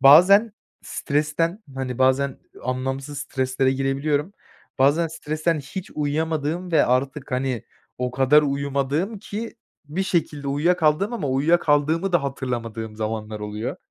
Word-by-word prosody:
Bazen 195 +10 +7 0.3
stresten 160 +7 -1
hani, 130 -2 -4
bazen 130 +1 +2 0.2
anlamsız 135 +3 -3
streslere 130 -1 0
girebiliyorum. 140 +5 0 0.5
Bazen 145 +5 +4
stresten 155 0 -1
hiç 175 +7 -7
uyuyamadığım 160 +3 -1
ve 155 - +5
artık, 130 +3 0
hani, 125 -3 -1 0.4
o 125 0 -1
kadar 135 +4 +5
uyumadığım 140 +7 -1
ki 215 +4 -6 0.3
bir 155 +6 -2
şekilde 155 -6 -1
uyuyakaldığım 160 - +2
ama 150 - -2
uyuyakaldığımı 155 +4 +2
da 175 - +3
hatırlamadığım 115 -5 -4
zamanlar 110 -1 -3
oluyor. 105 +1 -4
145 Hz, 115 wpm, -23 LUFS, 130-165 Hz, 0.5 s, Bazen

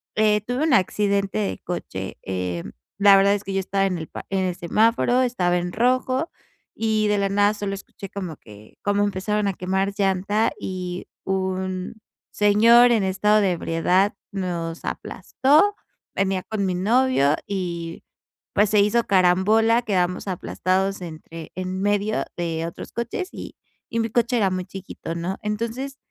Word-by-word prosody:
eh, 210 -1 +3
tuve 245 +7 -2
un 315 -5 +2
accidente 200 +1 +1
de 200 - -2
coche, 95 - -5
em, 90 -2 -4 0.3
la 200 -1 +8
verdad 200 +1 +4
es 205 - -5
que 195 - -4
yo 195 - +1
estaba 195 +1 0
en 185 -2 -2
el 160 -1 -6
pa - - -8
en 195 -1 0
el 180 -1 -2
semáforo, 230 +7 +2
estaba 185 -8 +1
en 175 0 -2
rojo, 255 +5 +1 0.5
y 215 -1 +1
de 210 0 +2
la 200 0 +1
nada 205 +1 +3
solo 205 -1 -3
escuché 195 0 -10
como 185 -7 -6
que 105 0 -16
como 205 0 +2
empezaron 205 +1 0
a 195 - 0
quemar 190 +2 -1
llanta 200 +2 +1
y 180 -1 -5 0.2
un 185 0 -2 0.4
señor 230 +4 +6
en 220 -4 +3
estado 210 +3 +3
de 190 -2 +2
ebriedad 180 +4 +1 0.2
nos 175 -4 -4
aplastó. 310 +10 +1 0.4
Venía 195 -1 0
con 210 -3 -2
mi 185 -1 0
novio 210 - +3
y, 170 -4 -4 0.5
pues, 205 0 +3
se 210 - +4
hizo 220 +3 +3
carambola, 200 +5 +4
quedamos 180 -3 0
aplastados 190 +1 -1
entre 165 -1 -9
en 185 +1 -3
medio 205 +1 0
de 165 -1 -2
otros 170 - -8
coches 235 - -3
y - - -8 0.4
y 230 - -1
mi 225 0 0
coche 240 +2 +1
era 200 -4 +2
muy 185 -1 -2
chiquito, 185 -3 -7
¿no? 175 +3 -3
Entonces, 230 +6 -3
195 Hz, 160 wpm, -23 LUFS, 180-215 Hz, 0.5 s, la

